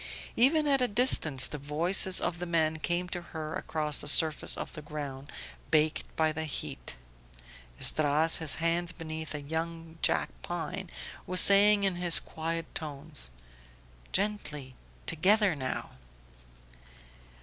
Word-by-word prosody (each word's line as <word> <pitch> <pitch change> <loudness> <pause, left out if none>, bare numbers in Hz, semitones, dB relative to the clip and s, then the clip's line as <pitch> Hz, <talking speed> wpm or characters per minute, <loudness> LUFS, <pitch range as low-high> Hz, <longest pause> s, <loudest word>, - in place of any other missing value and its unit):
Even 300 +6 +3
at 275 -2 +2
a 250 - +3
distance 180 - +3
the 150 - -8
voices 170 +6 +3
of 170 - -3
the 180 - -5
men 160 -2 0
came 175 +3 -2
to 175 0 -5
her 160 -2 -8
across 150 -2 -2
the - - -1
surface 155 +1 +5
of - - -7
the 150 - -9
ground 145 -2 -8 0.4
baked 155 0 +1
by 160 -1 +1
the 160 +1 -5
heat; - - -7 0.8
Esdras, 155 +2 +2
his 160 -3 +3
hands 165 +1 -1
beneath 160 -2 -7
a 150 - -6
young 165 +2 -6
jack - - +1
pine, - - -6 0.4
was 185 0 +5
saying 200 +2 +6
in 190 -3 0
his 175 -2 +3
quiet 165 +1 -5
tones: 150 - -3 0.8
"Gently... 155 -10 -3 0.3
together 195 +2 +3
now!" 130 -2 -5
160 Hz, 135 wpm, -28 LUFS, 150-180 Hz, 0.8 s, saying